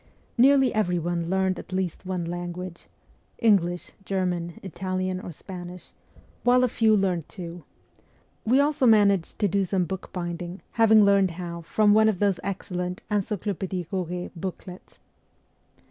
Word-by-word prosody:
Nearly 265 0 +5
every 180 -5 +1
one 170 0 -2
learned 190 -1 +1
at - - -11
least 185 -1 -3
one 180 -2 -2
language 175 +1 -6 0.5
English, 180 -6 +2
German, 180 -4 -2
Italian, 185 +1 -3
or 180 - -7
Spanish 180 +1 -9 0.5
while 250 +1 +4
a - - +4
few 220 -2 +3
learned 180 -5 0
two. 170 -3 -8 0.8
We 250 +5 +3
also 285 -2 +3
managed 200 -5 +4
to 205 - +2
do 195 +1 +1
some 185 -1 0
bookbinding, 175 0 -5
having 220 -2 +6
learned 200 -1 +4
how 170 -2 -5
from 205 +5 +3
one 220 +1 +5
of 210 - 0
those 200 -1 +1
excellent 180 -2 -4
Encyclopedic 195 -3 -2
Koret 180 -2 -3
booklets. 180 +1 -8
185 Hz, 135 wpm, -26 LUFS, 175-205 Hz, 0.8 s, having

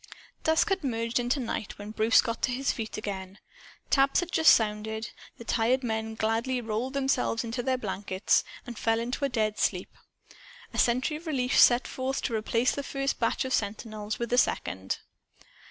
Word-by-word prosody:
Dusk 320 +6 +3
had 385 -3 0
merged 230 -2 -1
into 245 +4 0
night 225 -4 -4
when 205 +1 -7
Bruce 220 +2 +4
got 230 -1 -3
to 255 - +1
his 270 +2 0
feet 220 -4 -5
again. 195 -2 -5 0.5
Taps 275 +4 +4
had 350 0 -5
just 320 -2 +7
sounded. 220 +1 -2 0.3
The - - -9
tired 240 +3 +1
men 220 -1 -2
gladly 225 +4 0
rolled 235 +3 -3
themselves 270 -4 +1
into 235 +2 -3
their 260 +1 0
blankets 200 -3 0 0.2
and 240 -4 -8
fell 225 0 +2
into 245 +4 -2
a - - 0
dead 215 -3 -1
sleep. - - 0 0.8
A - - -2
sentry 255 +6 +2
relief 275 -7 -1
set 240 +1 +6
forth 265 +1 -3
to 240 - -2
replace 230 +2 +1
the 280 - -3
first 275 0 -2
batch 235 +3 0
of 260 - -2
sentinels 215 0 -2
with 235 -1 -4
the 245 - +5
second. 95 - -1
235 Hz, 175 wpm, -28 LUFS, 220-260 Hz, 0.8 s, just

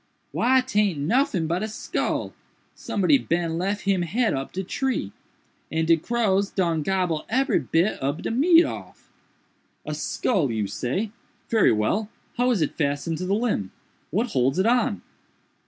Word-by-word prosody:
"Why 260 +1 +3
taint 210 - +1
noffin 185 - +1
but 170 +3 -1
a 215 - -1
skull—somebody 215 +1 -2
bin 170 -3 -1
lef 200 +3 -1
him 195 -2 +1
head 215 +8 0
up 135 0 -4
de 190 - -3
tree, 245 - -2 0.6
and 160 0 0
de 165 - +6
crows 200 +1 0
done 170 -4 0
gobble 180 -2 0
ebery 260 0 +2
bit 170 +6 0
ob 140 +3 -2
de - - -2
meat 330 +8 +5
off." - - -8 0.7
"A - - -3
skull, 180 - 0
you 110 -2 -1
say!—very 215 - -1
well—how 210 - -1
is 215 -10 +2
it 150 - -4
fastened 145 +2 -1
to 185 - -3
the 195 - +2
limb?—what 215 - -3
holds 130 +3 +1
it 190 - +2
on?" 230 -3 +1
190 Hz, 145 wpm, -24 LUFS, 160-230 Hz, 0.7 s, de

